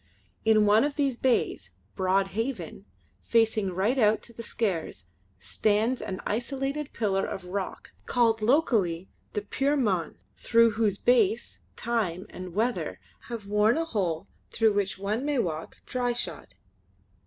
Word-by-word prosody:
In 220 -1 +5
one 210 +3 +5
of 290 0 -1
these 275 -4 +1
bays, 235 - 0 0.3
Broad 190 +1 +2
Haven, 225 +5 -4 0.4
facing 225 -3 +2
right 205 +9 +1
out 215 -1 +3
to 235 - -8
the 230 - -7
Skares, 195 - -2 0.3
stands 215 - +1
an 185 - -5
isolated 270 +5 -2
pillar 195 -3 0
of 190 - -5
rock 190 +1 -5 0.2
called 230 -3 +2
locally 215 - +2 0.2
the 210 - -2
"Puir 275 +7 0
mon" 190 - 0 0.2
through 230 0 +4
whose 210 -2 +1
base, 455 - +2 0.2
time 200 -7 -1
and 180 -1 -8
weather 235 +4 -1 0.3
have 230 -4 -6
worn 210 +5 +3
a 330 - 0
hole 195 - -2 0.2
through 220 -2 +2
which 200 -2 -1
one 205 +5 -2
may 290 -1 0
walk 165 -8 -2
dryshod. 245 -1 -3
220 Hz, 140 wpm, -27 LUFS, 195-245 Hz, 0.4 s, In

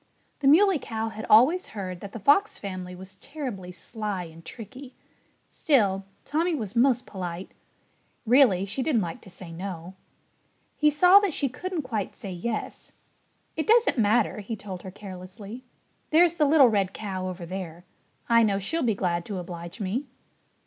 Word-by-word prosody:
The 280 - +1
Muley 360 +3 +6
Cow 225 -2 -3
had 220 0 -7
always 270 +12 +6
heard 185 -3 -4
that 200 +1 -8
the - - -7
Fox 295 - +3
family 185 -2 -6
was 190 +1 -11
terribly 250 -12 -6
sly 205 0 -4
and 165 0 -12
tricky. 250 +8 -10 0.5
Still, 200 - +2 0.2
Tommy 330 +3 0
was 220 -5 -4
most 250 0 +3
polite. 180 -2 -6 0.7
Really, 230 -6 +5
she 210 +7 -3
didn't 250 -7 +2
like 170 -1 -6
to - - -14
say 180 -1 -10
no. 175 0 -6 0.8
He 300 - +4
saw 360 +6 +7
that 405 -6 -1
she 280 - +1
couldn't 345 +5 -4
quite 220 -6 -3
say 200 -6 -7
yes. 215 +6 -4 0.6
"It 315 - -2
doesn't 455 - +4
matter," 215 0 +2
he 210 +2 -5
told 190 -4 -8
her 190 - -8
carelessly. 195 +5 -10 0.4
"There's 335 +1 +5
the 300 - +4
little 285 -3 +6
red 200 -3 0
cow 190 -3 -4
over 180 -1 -7
there. 175 -1 -7 0.4
I 230 -1 +5
know 205 -3 +2
she'll 315 - -2
be 230 -5 +1
glad 175 -3 -1
to 200 - -4
oblige 175 +1 -7
me." 220 +8 -2
210 Hz, 165 wpm, -26 LUFS, 185-275 Hz, 0.8 s, saw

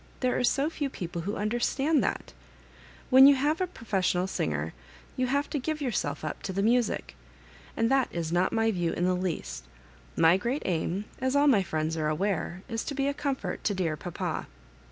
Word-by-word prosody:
There 255 -1 +1
are - - 0
so 275 +4 +2
few 290 -4 -2
people 175 -7 -5
who 205 +5 -3
understand 250 +8 +1
that - - -3 0.8
When 265 +1 +10
you 280 - +7
have 295 +6 0
professional 185 -5 0
singers, 80 - -2 0.4
you 255 - 0
have 280 +3 0
to 295 - 0
give 310 +4 -2
your 270 -4 -1
self 150 -6 -2
up 155 - -4
to 195 0 -2
music; 235 - +1 0.6
and 230 +2 +2
that 270 -2 +3
is 165 -2 -3
not 175 +2 +2
my 225 0 +2
view 175 -4 -1
in 175 - 0
the 185 - +2
least 155 - -3 0.5
My 165 +2 +6
great 245 +8 -2
aim, 180 +3 -1
as 260 +1 0
all 285 +1 +5
my 255 -9 +5
friends 160 -3 -2
are 155 -1 0
aware, 175 +2 -1
is 230 -2 -3
to 285 - -4
be 275 0 0
a 280 - +1
comfort 265 -11 -3
to 205 - 0
dear 170 -4 0
papa." 170 +2 -4
205 Hz, 195 wpm, -28 LUFS, 175-265 Hz, 0.8 s, When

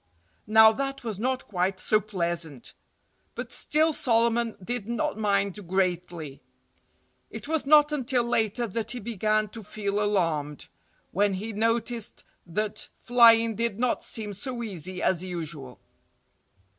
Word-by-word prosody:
Now, 220 +1 +8
that 275 +3 -3
was 215 -4 -4
not 255 +3 -1
quite 185 -1 -1
so 215 - +3
pleasant. 170 - -3 0.6
But - - -6
still 315 +1 +2
Solomon 235 -2 +1
did 235 +1 -4
not 235 -3 -1
mind 200 -2 0
greatly. 175 -6 -2 0.9
It - - -7
was 315 -3 -1
not 300 0 +6
until 260 -4 0
later 235 0 0
that 220 +2 -3
he 245 - -1
began 215 -1 0
to 225 +2 -9
feel 205 0 -2
alarmed, 165 -8 -1 0.4
when 200 +1 +2
he 215 +4 -5
noticed 230 +1 -1 0.2
that 205 +5 -2
flying 230 -1 +5
did 230 -1 -2
not 250 0 0
seem 210 -2 -3
so 235 +4 -5
easy 185 -3 -3
as 185 -1 +2
usual. 155 -8 -6
215 Hz, 130 wpm, -27 LUFS, 185-235 Hz, 0.9 s, Now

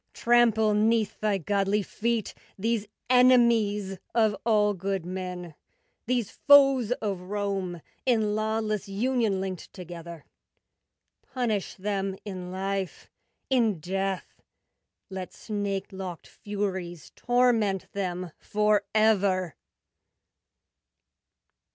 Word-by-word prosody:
Trample 230 -3 +3
'neath 220 0 +2
thy 210 -2 +1
godly 200 +3 0
feet 230 +1 -2 0.2
These 220 +1 -1 0.2
enemies 230 -6 +4 0.2
Of 220 -3 +3
all 210 -2 +4
good 190 -1 -3
men, 180 -2 -5 0.5
These 245 -4 0
foes 275 -5 +5
of 195 -4 -2
Rome 195 -3 -3 0.2
In 220 -4 +2
lawless 215 -1 -1
union 220 -1 0
linked 190 -2 -5
Together; 170 -3 -9 1.0
Punish 225 -6 -2
them 195 -1 -2
in 185 -3 -6
life, 190 0 -4 0.4
in 225 -8 +2
death; 190 +3 -3 0.7
Let 190 -1 -6
snake 200 -2 -3
locked 190 -3 -7
Furies 190 -5 -5
torment 235 -6 +2
them 180 -3 -3
Forever! 205 -4 +2
205 Hz, 90 wpm, -27 LUFS, 190-220 Hz, 1.0 s, foes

